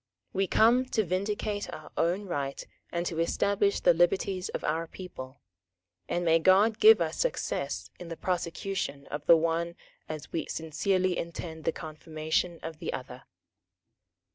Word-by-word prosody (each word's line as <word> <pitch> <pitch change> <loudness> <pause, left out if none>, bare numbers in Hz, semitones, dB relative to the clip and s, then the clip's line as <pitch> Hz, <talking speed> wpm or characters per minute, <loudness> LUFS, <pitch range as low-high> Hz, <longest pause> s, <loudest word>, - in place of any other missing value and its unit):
"We 195 0 +1
come 240 +6 +4
to 225 -3 0
vindicate 205 +3 -2
our - - -9
own 180 +5 +1
right 140 -6 -3 0.3
and 170 0 -1
to 165 -2 -2
establish 200 +4 +2
the 175 - +6
liberties 180 +2 +1
of - - -4
our 165 +2 -1
people; 140 -8 -9 0.7
and 175 0 0
may 165 0 +5
God 200 +6 +4
give 440 +1 +8
us - - -1
success - - -2
in 175 - -8
the 165 -1 -6
prosecution 175 -4 -2
of 145 0 -4
the 170 - +9
one 165 +1 0 0.3
as 155 -2 -6
we 165 - -2
sincerely 185 +3 0
intend 165 -1 -6
the - - +3
confirmation 160 +1 -3
of 160 -1 -6
the - - -3
other!" - - -7
170 Hz, 150 wpm, -29 LUFS, 160-195 Hz, 0.7 s, the